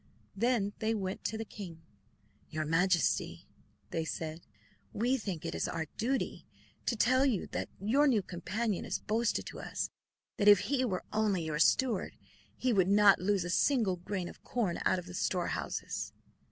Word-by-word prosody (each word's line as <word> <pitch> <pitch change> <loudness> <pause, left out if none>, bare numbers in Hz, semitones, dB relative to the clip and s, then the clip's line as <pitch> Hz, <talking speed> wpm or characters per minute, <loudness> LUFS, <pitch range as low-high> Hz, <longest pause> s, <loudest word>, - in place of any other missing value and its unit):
Then 230 -4 +1
they 225 +1 +1
went 190 -2 -3
to 220 - -1
the 225 - -4
king. 175 -7 -9 0.7
"Your 155 -1 -2
Majesty," 170 +2 +1 0.4
they 165 - -1
said, 160 +1 -5 0.5
"we 245 +5 +2
think 195 -10 -4
it 165 - -1
our 160 -1 -2
duty 260 +4 -2 0.4
to 235 - +2
tell 255 +4 +4
you 250 -9 +1
that - - -3
your 255 +10 +3
new 225 -7 +3
companion 200 +4 -2
has - - -2
boasted 230 +2 0
to - - -8
us - - -3 0.5
that 205 - +1
if 205 -2 +9
he 275 -2 0
were 190 -7 -1
only 210 -5 +1
your 155 -1 -2
steward 245 -7 +2 0.4
he 255 -2 +1
would 190 -3 +3
not 205 0 +6
lose 195 0 +1
a 175 - -3
single 220 -6 +2
grain 180 0 -4
of - - -12
corn 210 -9 -1
out 185 - +3
of 180 - -5
the 180 - -9
storehouses. 180 0 -2
200 Hz, 165 wpm, -32 LUFS, 175-230 Hz, 0.7 s, if